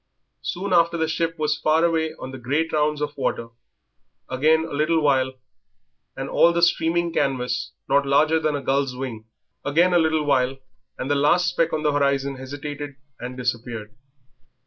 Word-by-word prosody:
Soon 185 +1 -3
after 170 0 +4
the 160 -1 0
ship 165 +1 -1
was 150 0 0
far 160 +2 +3
away 160 -1 0
on 130 - -8
the 130 - -8
great 145 +7 -1
round 150 -1 +1
of 145 0 -4
waters, 115 -4 -2 0.8
again 155 +5 +2
a 165 - -8
little 155 +3 +2
while 135 -3 +2 0.8
and - - -4
all 170 - +4
the 170 0 0
streaming 170 0 +2
canvas 125 -4 -1
not 140 0 +2
larger 155 +3 +3
than 155 -2 0
a 140 - -4
gull's 135 -1 0
wing, 125 -4 -6 0.4
again 170 +5 +3
a 175 - +5
little 160 -1 +2
while 135 -2 +1 0.4
and 135 - -3
the - - +4
last 150 +5 +3
speck 165 - 0
on 155 - -2
the 150 - +2
horizon 140 -1 +1
hesitated 145 +2 -7 0.2
and 125 +1 -7
disappeared. 115 -3 -4
145 Hz, 170 wpm, -23 LUFS, 130-160 Hz, 0.8 s, a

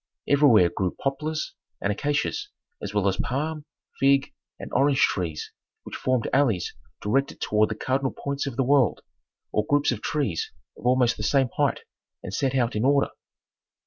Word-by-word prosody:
Everywhere 125 -11 +5
grew 95 -2 -1
poplars 155 +3 -2 0.3
and 100 - 0
acacias, 145 - -1 0.3
as - - -4
well 105 -1 +1
as 95 - +1
palm, 150 +3 -2 0.3
fig, 140 +1 +3 0.3
and - - -8
orange 140 -1 +3
trees 85 -5 -1 0.3
which - - -8
formed 130 -3 0
alleys 115 -11 +2 0.3
directed 135 +7 0
toward 105 0 +2
the 110 - -3
cardinal 130 +4 0
points 140 0 -3
of 135 - -4
the 135 - +1
world, 130 - +3 0.5
or 105 - +1
groups 145 +5 +2
of 115 -4 -3
trees 140 - -1 0.2
of 120 - -5
almost 125 -2 +3
the - - -6
same 130 +5 +2
height - - +1 0.4
and 95 - -6
set 135 +4 0
out 120 -4 +1
in 105 - 0
order. 140 +1 +3
130 Hz, 165 wpm, -25 LUFS, 105-140 Hz, 0.5 s, Everywhere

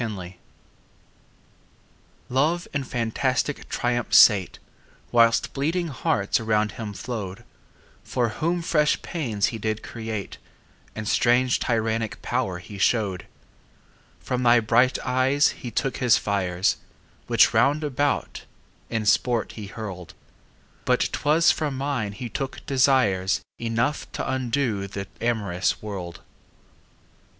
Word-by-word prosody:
Song 95 -6 -5 2.0
LOVE 155 +7 +1
in 140 -1 -1
fantastic 130 +4 -1
triumph 120 0 0
sate 100 -5 +6 0.5
Whilst 115 -1 +3
bleeding 165 +5 -1
hearts 100 -6 0
around 110 -1 +1
him 110 -3 -6
flow'd, 100 -4 -6 0.6
For 120 -2 -1
whom 170 +9 -1
fresh 150 -3 +2
pains 115 - -1
he 115 - -5
did 110 0 -2
create 110 -3 -6 0.6
And 110 -1 -5
strange 125 +2 +3
tyrannic 115 -2 -1
power 120 -7 -1
he 100 +2 -10
show'd: 100 -3 +1 0.9
From 125 +10 -3
thy 120 -1 +5
bright 120 +3 +3
eyes 130 +3 +3
he 120 - -7
took 135 +4 -2
his 125 -4 +4
fires, 95 -3 0 0.5
5 - - -27
Which - - +5
round 145 +4 +3
about 145 0 -1 0.4
in 115 -2 -2
sport 120 +2 +2
he 105 -3 -8
hurl'd; 95 -5 -8 0.7
But - - +2
'twas 155 +2 +3
from 145 -4 -2
mine 130 -7 -2
he 125 +3 -6
took 135 +3 -5
desires 130 -9 +2 0.2
Enough 115 +5 -1
t' - - -4
undo 120 -5 -1
the 100 0 -6 0.2
amorous 100 -6 0
world. 90 -5 -7
115 Hz, 120 wpm, -24 LUFS, 105-130 Hz, 2.0 s, sate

